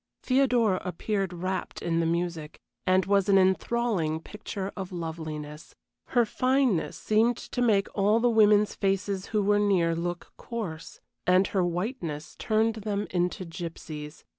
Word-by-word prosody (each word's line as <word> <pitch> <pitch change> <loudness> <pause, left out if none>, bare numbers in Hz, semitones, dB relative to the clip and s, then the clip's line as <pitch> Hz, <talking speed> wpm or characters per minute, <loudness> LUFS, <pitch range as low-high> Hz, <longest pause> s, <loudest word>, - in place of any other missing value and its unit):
Theodora 245 -7 +3
appeared 195 +1 -2
wrapped 185 +2 -4
in 165 -1 0
the 165 - +1
music, 170 -2 -2 0.3
and 185 0 +4
was 200 0 +2
an 195 - +6
enthralling 190 -3 +1
picture 200 +1 -6
of 190 -1 -6
loveliness; 160 -3 -6 0.3
her 240 -2 +3
fineness 255 -5 +1
seemed 225 +2 +2
to 245 - -5
make 210 -5 +3
all 210 +2 +3
the 245 - +3
women's 210 -2 +4
faces 195 0 -1
who 210 -2 0
were 205 +1 +3
near 180 -5 +2
look 175 +1 -4
coarse, 185 -9 -6 0.3
and 185 +1 +5
her 190 -2 +2
whiteness 175 - -3
turned 220 0 +1
them 205 -1 -2
into 180 +1 -1
gypsies. 160 -3 -7
190 Hz, 140 wpm, -27 LUFS, 170-215 Hz, 0.3 s, an